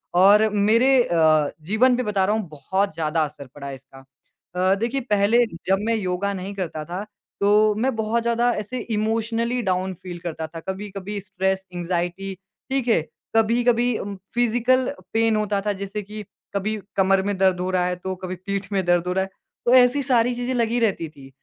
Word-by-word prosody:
और 205 +4 +6
मेरे 215 +6 +3
अ, 155 -5 +3
जीवन 220 +10 +3
पे 255 - 0
बता 200 -3 +1
रहा 210 +3 +1
हूँ 215 -4 -3
बहुत 190 +6 -1
ज़्यादा 160 0 0
असर 145 -2 -10
पड़ा 140 -1 -7
इसका। 135 0 -12 0.6
अ, 185 +1 +3
देखिए 235 +6 -1
पहले 210 +4 +4 0.2
जब 190 +1 +3
मैं 230 - +2
योगा 200 -1 -1
नहीं 190 +1 -5
करता 165 -5 -4
था 180 +4 -5 0.4
तो 210 +1 +4
मैं 250 +4 0
बहुत 220 +1 0
ज़्यादा 235 +1 +2
ऐसे 215 +5 -4 0.2
इमोशनली 230 +3 0
डाउन 185 -2 -1
फ़ील 175 -1 -9
करता 160 -2 -5
था। 165 +1 -8
कभी-कभी 195 +2 -5
स्ट्रेस, 190 0 -2
एंज़ाइटी 175 +2 -2 0.4
ठीक 265 -2 -1
है। 225 -8 +4 0.3
कभी-कभी 235 +1 +3
उम, 200 0 -5 0.2
फ़िज़िकल 245 +2 +2 0.3
पेन 225 -1 +3
होता 210 -1 0
था 205 - +1
जैसे 200 +2 -5
कि 210 +2 -7 0.3
कभी 215 +2 -1 0.2
कमर 195 0 +3
में 200 0 -1
दर्द 190 -1 +3
हो 180 +1 -1
रहा 180 -1 +2
है, 180 0 -1
तो 185 +1 -5
कभी 185 0 -6
पीठ 195 +2 -5
में 195 -2 +1
दर्द 175 0 +2
हो - - 0
रहा 190 - +1
है। 190 - -6 0.4
तो 240 - +4
ऐसी 255 +3 +5
सारी 245 -2 +2
चीज़ें 245 +1 -2
लगी 235 0 +1
रहती 200 -7 0
थीं। 140 -3 -14
200 Hz, 190 wpm, -23 LUFS, 185-225 Hz, 0.6 s, और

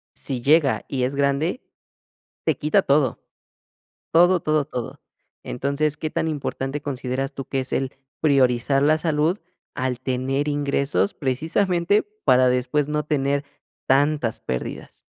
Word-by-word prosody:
si 130 -3 -4
llega 145 +1 +3
y 130 -2 -2
es 130 +2 0
grande, 140 - 0 0.9
te - - +2
quita 155 +6 +2
todo, 140 -5 +2 0.9
todo, 175 +2 +5
todo, 155 -1 +1
todo. 125 -5 -6 0.4
Entonces, 140 +3 -1
¿qué 155 - -3
tan 160 - -1
importante 145 -2 -3
consideras 135 0 -3
tú 135 - -5
que 135 - -1
es 130 - -4
el 135 -1 -1 0.3
priorizar 135 -2 +3
la 155 +2 +4
salud 160 +3 +1 0.4
al 130 -1 -2
tener 130 +2 -1
ingresos 145 +4 0
precisamente 170 +8 +1 0.2
para 130 -1 +5
después 125 +3 +1
no 150 0 -1
tener 140 -1 0 0.4
tantas 140 -3 +2
pérdidas? 65 -1 -5
140 Hz, 130 wpm, -23 LUFS, 130-155 Hz, 0.9 s, todo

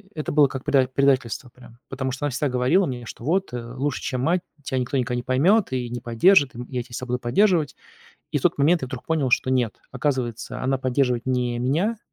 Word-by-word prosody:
это - - -6
это 150 - -3
было 145 -2 +6
как 135 0 -7
предать 135 -3 +2
предательство 130 -3 +1
прям. 120 -2 -16
Потому 130 -1 -3
что 135 +3 -4
она - - +1
всегда 140 +2 -1
говорила 130 +10 +2
мне, 125 -5 -5
что: 115 - -10
"Вот, 175 +1 0
э, 120 0 -6
лучше, 140 0 -2
чем 125 -1 -2
мать, 175 +6 +1 0.2
тя 130 - -2
никто 130 +2 -1
никогда 125 -1 -1
не 120 - -3
поймёт 165 - +3
и 125 -2 -2
не 120 -1 -5
поддержит. 135 - +4
И, - - -9
м, 125 - -7
я 125 -2 -2
тя 120 - -21
всегда 125 - -5
буду 125 0 -1
поддерживать". 155 - +2 0.6
И - - +1
в - - -13
тот - - +2
момент 155 +4 +3
я 130 - -3
вдруг 130 -1 -7
понял, 155 -5 0
что 130 +2 +2
нет. 125 -4 +1 0.2
Оказывается, 125 -6 -2
она 135 +1 +1
поддерживает 125 -2 0
не 125 -2 0
меня, 165 - 0
130 Hz, 240 wpm, -23 LUFS, 125-145 Hz, 0.6 s, было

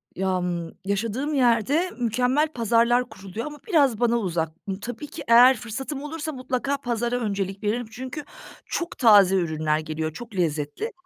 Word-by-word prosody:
Yam 180 -3 -1
yaşadığım 230 +9 -1
yerde 270 - +2
mükemmel 250 +6 +2
pazarlar 235 +1 +2
kuruluyor 195 +2 -7
ama 295 0 -8
biraz 280 - +3
bana 235 -1 +3
uzak. 170 -6 -1 0.2
Imm, 190 0 -3
tabii 245 +6 -6
ki - - -8
eğer 245 +2 +7
fırsatım 270 +5 -5
olursa 310 +1 -4
mutlaka 260 +1 -2
pazara 240 -2 -2
öncelik 200 -4 -3
veririm. 225 +2 -1
Çünkü 260 +5 -6 0.4
çok 340 -1 -4
taze 205 -6 +6
ürünler 155 -3 0
geliyor, 155 0 -4
çok 225 +3 -9
lezzetli 160 - -2
230 Hz, 145 wpm, -24 LUFS, 190-260 Hz, 0.4 s, eğer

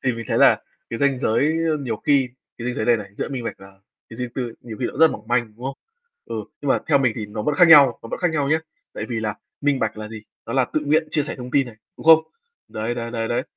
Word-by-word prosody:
Thì 130 - +2
mình 115 0 -6
thấy - - +1
là - - +6 0.3
cái 115 - -3
ranh 140 -2 +2
giới, 115 +2 +2 0.2
ơ, 155 - +1
nhiều 120 -5 -3
khi 140 +1 +2 0.3
cái 115 - -6
ranh 125 - -1
giới 110 - -2
này 120 - +5
này, 105 -3 -7
giữa - - -3
minh 130 -4 -5
bạch - - -3
và 95 0 -16 0.3
cái 115 - -11
riêng 125 0 -3
tư 130 - -1
ấy, 120 - -6
nhiều 115 -3 -8
khi 125 - +1
nó - - -7
rất 160 0 +7
mỏng 110 +1 -8
manh, 120 -3 0
đúng 120 - -11
không? 135 +1 -4 0.5
Ừ, - - -7 0.3
nhưng - - -4
mà - - +4
theo 145 -3 +4
mình 130 -4 +2
thì 105 -2 -4
nó 105 +1 -5
vẫn 150 - 0
khác 175 +3 +6
nhau, 140 -6 +8
nó 115 - -9
vẫn - - -5
khác 175 -2 +2
nhau 145 -3 0
nhá. 160 +2 +2 0.3
Tại - - -4
vì 115 -2 -2
là 105 -1 -2 0.3
minh 145 -2 +2
bạch - - -1
là 105 0 -6
gì? 110 -1 -9 0.2
Nó 115 - -4
là 130 0 +3
tự 155 - +1
nguyện 155 +2 +2
chia 150 - +1
sẻ 145 - -5
thông 125 -1 -8
tin 135 0 +2
này, 115 -3 -11 0.2
đúng - - -11
không? 160 -1 +10 0.5
Đấy, 110 +2 -3
đấy, 115 -1 -4
đấy, 115 -1 -2
đấy, 120 - 0
125 Hz, 300 wpm, -22 LUFS, 115-140 Hz, 0.5 s, không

